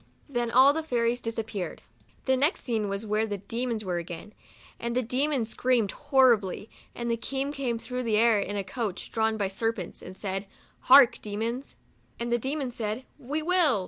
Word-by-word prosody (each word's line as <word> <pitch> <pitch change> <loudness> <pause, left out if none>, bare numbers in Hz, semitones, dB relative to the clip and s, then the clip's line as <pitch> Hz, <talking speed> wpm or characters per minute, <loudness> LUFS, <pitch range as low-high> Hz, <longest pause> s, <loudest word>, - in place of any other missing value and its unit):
Then 240 -4 -1
all 260 +4 +6
the 320 - -1
fairies 245 -5 0
dis 230 0 -4
appeared. 210 -6 -4 0.4
The 260 - +3
next 290 +8 +1
scene 220 -4 -1
was, 200 +2 -3
where 215 +1 +1
the 205 -1 -3
demons 225 +2 -3
were, 180 -2 -1
again; 170 +5 -8 0.5
and 235 0 -3
the 255 - +2
demons 255 0 0
screamed 235 -4 +1
horribly, 245 -9 +2 0.2
and 235 0 -2
the 230 - +1
King 270 +4 -3
came 260 -5 -2
through 250 +2 -4
the 225 -3 +1
air, 225 -1 +5
in 205 +1 -3
a 200 - -1
coach, 205 -2 -4
drawn 220 -1 +1
by 200 -2 0
ser 225 +4 0
pents, 185 -6 -7
and 185 - -8
said, 195 0 -3 0.4
"Hark, 260 -2 +8
Demons 225 +5 -4 0.2
;" - - -36
and 235 0 -2
the 240 - +2
demons 265 0 -2
said, 220 +3 -3
" - - -36
We 310 +1 0
will." 330 - +4
230 Hz, 200 wpm, -27 LUFS, 210-255 Hz, 0.5 s, Hark